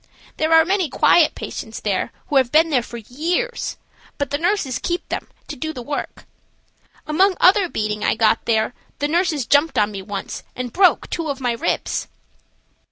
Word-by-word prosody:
There 315 +1 0
are 325 0 +7
many 375 -3 +1
quiet 330 -3 +4
patients 220 0 -6
there 200 -3 -1 0.2
who 285 - +3
have 260 -2 +3
been 320 +2 +4
there 260 -4 +3
for 235 0 -9
years, 340 - -2 0.4
but 285 -3 -2
the 285 - 0
nurses 335 - 0
keep 345 0 -3
them - - -4 0.2
to - - -6
do 315 +4 -4
the 250 - -7
work. 290 +4 -5 0.8
Among 370 +5 +2
other 375 -1 +5
beating 210 -4 -2
I - - +2
got 220 0 +2
there, 220 +1 +1 0.2
the 290 - -1
nurses 320 -4 0
jumped 290 +5 +3
on 210 0 +2
me 195 -1 -6
once 200 0 -6
and 250 -2 -5
broke 370 -1 +4
two 330 -3 -2
of 280 -1 -3
my 250 -2 0
ribs. 230 - -2
290 Hz, 180 wpm, -21 LUFS, 235-340 Hz, 0.8 s, are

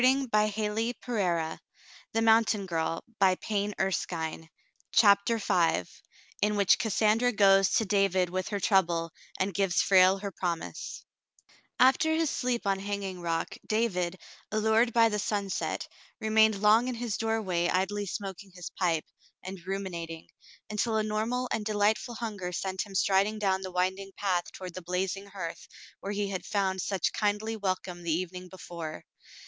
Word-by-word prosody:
Falling 265 0 +3
on 210 0 +4
his 205 - -8
hurt 220 +2 -1
spirit, 175 -9 -1 0.5
it 225 0 +1
sounded 220 -4 +3
heavenly 200 +4 0 0.2
sweet. 160 -3 -3 0.4
CHAPTER 200 +2 +5
V 165 - +2 0.6
IN 210 0 +2
WHICH 200 -2 +4
CASSANDRA 220 +3 +2
GOES 195 -2 +5
TO 220 - +2
DAVID 190 -3 +2
WITH 185 0 -2
HER 205 -1 -2
TROUBLE, 170 -4 +2 0.3
AND 190 +1 0
GIVES 195 -1 +2
FRALE 190 0 +6
HER 200 0 -5
PROMISE 175 -3 -4 0.7
After 265 +5 +5
his 320 -2 +1
sleep 245 -3 -1
on 195 -1 +1
Hanging 195 -2 -4
Rock, 165 -1 -1 0.2
David, 190 -5 0 0.3
allured 220 +2 +3
by 230 0 +5
the 210 -1 -1
sunset, 200 -1 -2 0.3
remained 220 -1 +3
long 220 +4 +5
in 255 - -2
his 230 -3 -3
doorway 200 -6 0
idly 200 +2 0
smoking 195 0 -6
his 180 -1 -7
pipe, 165 -4 0 0.4
and 190 0 -7
ruminating, 170 -4 -4 0.5
until 220 +1 0
a 215 - +1
normal 220 +4 -1
and 220 - -1
delightful 215 +3 +1
hunger 210 -6 -4
sent 190 +3 -3
him 195 - -11
striding 200 +3 +2
down 190 -2 +1
the 185 -1 -6
winding 190 +2 -1
path 185 -3 -1
toward 185 -2 -8
the 185 - -7
blazing 185 +3 -2
hearth 190 -4 -7 0.3
where 200 - -5
he 200 -1 -1
had 185 - -3
found 190 -2 -1
such 195 -3 -1
kindly 210 +1 0
welcome 185 -3 -3
the 170 - -5
evening 180 +2 -3
before. 170 -4 -8
195 Hz, 150 wpm, -29 LUFS, 185-215 Hz, 0.7 s, FRALE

